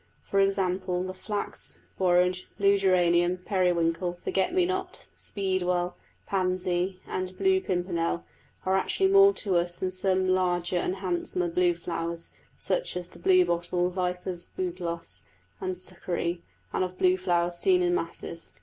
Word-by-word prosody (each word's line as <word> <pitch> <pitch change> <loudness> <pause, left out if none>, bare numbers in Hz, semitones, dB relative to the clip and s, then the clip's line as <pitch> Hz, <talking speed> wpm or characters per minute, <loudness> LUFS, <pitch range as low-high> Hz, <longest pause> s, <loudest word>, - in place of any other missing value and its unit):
For 195 - 0
example, 185 -2 +1
the 185 0 -4
flax, 205 +2 -4 0.2
borage, 180 0 +3
blue 200 0 +4
geranium, 180 -2 +3
periwinkle, 175 -2 +1
forget 185 +2 -1
me 365 0 +3
not, 375 0 -3
speedwell, 180 -2 -1 0.3
pansy 185 -1 0
and 185 0 -4
blue 380 0 +3
pimpernel, 175 - -1 0.4
are 190 0 +2
actually 385 - +1
more 395 0 +8
to 190 -4 0
us 175 0 0
than 185 +1 -2
some 185 0 +1
larger 180 -1 +1
and 180 +1 0
handsomer 180 -2 -1
blue 175 0 +2
flowers, 170 0 -4 0.3
such - - -1
as 180 -1 -6
the - - -15
blue 370 -1 +5
bottle, 175 +1 0
vipers' 180 -1 -3
bugloss, 170 - -4 0.4
and 185 -1 -3
succory, 175 -1 -3 0.3
and - - +1
of 185 0 -4
blue 185 0 +4
flowers 175 -2 0
seen 365 -1 +4
in 355 0 +2
masses. 355 - -5
180 Hz, 140 wpm, -28 LUFS, 175-190 Hz, 0.4 s, more